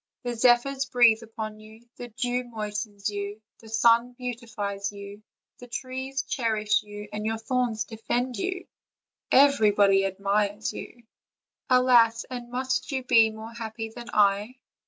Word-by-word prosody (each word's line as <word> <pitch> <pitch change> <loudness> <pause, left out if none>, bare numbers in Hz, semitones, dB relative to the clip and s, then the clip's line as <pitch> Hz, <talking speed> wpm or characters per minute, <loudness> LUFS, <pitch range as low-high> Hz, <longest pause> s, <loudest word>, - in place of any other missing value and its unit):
The 245 -1 -2
zephyrs 250 +3 +3
breathe 235 -2 +5
upon 220 -1 -7
you, 220 +2 -16
the 245 - -7
dew 245 +2 -2
moistens 210 -3 -5
you, 205 +1 -5 0.2
the 225 - -14
sun 235 +2 +3
beauti 245 -2 -6
fies 200 -1 -3
you, 200 0 -10 0.4
the 245 - -11
trees 260 +2 -4
cherish 215 -3 0
you, 210 0 -9
your 215 +1 -2
thorns 240 -1 -1
defend 240 +2 -3
you, 365 - -3 0.7
and 270 - +8
everybody 205 -5 +4
admires 200 +2 -1
you. 240 - -9 0.7
Alas! 240 -3 +5
and 245 -1 -6
must 260 +3 -2
you 265 -1 -2
be 230 -3 +5
more 220 +1 -9
happy 225 -1 -6
than 235 +1 -10
I?" 205 +3 +2
225 Hz, 140 wpm, -26 LUFS, 210-245 Hz, 0.7 s, and